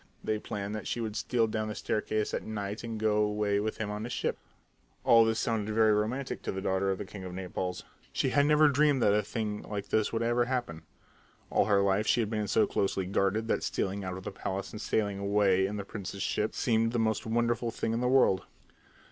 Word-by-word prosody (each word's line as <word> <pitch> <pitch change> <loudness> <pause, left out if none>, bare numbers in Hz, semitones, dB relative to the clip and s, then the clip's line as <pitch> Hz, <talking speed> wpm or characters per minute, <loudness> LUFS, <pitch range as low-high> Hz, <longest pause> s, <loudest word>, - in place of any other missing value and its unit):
They 110 0 -1
planned 100 -1 -5
that 110 - -5
she - - -2
should 110 -2 -3
steal 115 0 +1
down 110 0 -2
the 105 - -4
staircase 110 0 -1
at - - -1
night 105 0 -5
and 115 -2 -4
go 110 -1 +2
away 105 -1 +1
with 110 +1 -2
him 105 -2 -3
on 105 +1 -4
his 120 - -5
ship. - - -2 0.6
All 115 -1 +7
this 110 0 +1
sounded 110 -2 -1
very 110 -1 +5
romantic 115 +6 -1
to - - -3
the 95 - -4
daughter 95 0 0
of 95 - 0
the 105 - -5
king 95 0 -9
of 90 -1 -7
Naples. 90 -1 -4 0.3
She - - 0
had 145 0 +3
never 150 0 +6
dreamed 145 -2 +3
that 100 - +5
a 105 - +3
thing 105 -2 -3
like 100 -1 -6
this 110 -1 +1
would 115 0 -1
ever 120 +1 +2
happen. 120 -10 -3 0.7
All - - +3
her 100 -1 +3
life 100 +2 +1
she - - +3
had 110 -1 -2
been 105 -2 -1
so 110 - +3
closely 95 -1 -1
guarded 100 +4 0
that - - +1
stealing 100 +1 -2
out 90 -1 -4
of 95 - -9
the - - -5
palace 95 0 -4
and 105 - -7
sailing 100 -3 0
away 100 -1 +3
in 105 +1 -4
the 100 - -5
prince's 100 -2 -5
ship 105 +1 -1
seemed 115 -1 +1
the - - +1
most 110 -1 0
wonderful 120 +1 +1
thing 115 0 -2
in 115 - -1
the 125 - +1
world. 130 -8 +4
105 Hz, 230 wpm, -30 LUFS, 100-115 Hz, 0.7 s, All